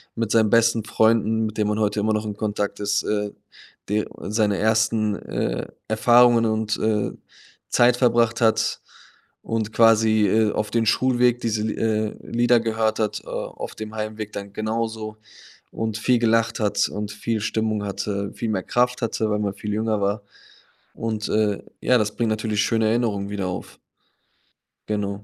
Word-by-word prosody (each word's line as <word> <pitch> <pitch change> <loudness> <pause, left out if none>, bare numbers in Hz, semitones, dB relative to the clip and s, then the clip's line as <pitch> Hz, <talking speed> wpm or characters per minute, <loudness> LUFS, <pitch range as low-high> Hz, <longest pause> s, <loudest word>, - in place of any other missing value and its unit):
mit 115 -2 -2
seinen 110 -2 +4
besten 115 -1 +3
Freunden, 110 0 +2
mit 110 0 -8
denen 105 -1 +1
man 105 +1 -1
heute 105 -1 0
immer 110 +1 +1
noch 110 0 -1
in 105 -1 -4
Kontakt 105 -1 -2
ist, 100 0 0
äh, 105 -1 -1 0.6
d 105 +1 +1 0.2
seine 105 -2 0
1., 110 -1 +2
äh, - - -3 0.2
Erfahrungen 120 +1 +5
und, 110 -1 0
äh, 110 -2 0 0.6
Zeit 120 0 +4
verbracht 120 -2 +2
hat 110 -1 +2 0.6
und 110 -1 -2
quasi, 110 -2 +4
äh, 110 +1 +3
auf 105 -1 -2
den 115 0 +1
Schulweg 125 -1 +3
diese, 110 -2 -1
äh, 110 -1 -1
Lieder 120 0 +3
gehört 110 -1 0
hat, 105 -1 -1
äh, - - -20
auf - - -6
dem 110 0 -7
Heimweg 110 0 -5
dann 100 0 -6
genauso 110 0 -3 0.6
und 110 -1 -3
viel 120 +3 +2
gelacht 115 0 +2
hat 105 -2 +1
und 105 0 -5
viel 110 +1 -2
Stimmung 110 -1 -1
hatte, 100 0 -3
viel 115 - -4
mehr 95 -4 -1
Kraft 125 0 0
hatte, 110 -1 -1
weil 105 - 0
man 100 -2 -1
viel 105 +1 -5
jünger 110 -1 0
war. 100 +1 0 0.7
Und, 110 -1 -3
äh, 105 -2 +1 0.2
ja, 125 - +4
das 105 -2 -1
bringt 115 -2 0
natürlich 110 -1 0
schöne 110 0 +1
Erinnerungen 110 -4 0
wieder 100 -2 -3
auf. 90 - -6 1.1
Genau. 100 -1 -2
110 Hz, 165 wpm, -23 LUFS, 105-115 Hz, 1.1 s, Erfahrungen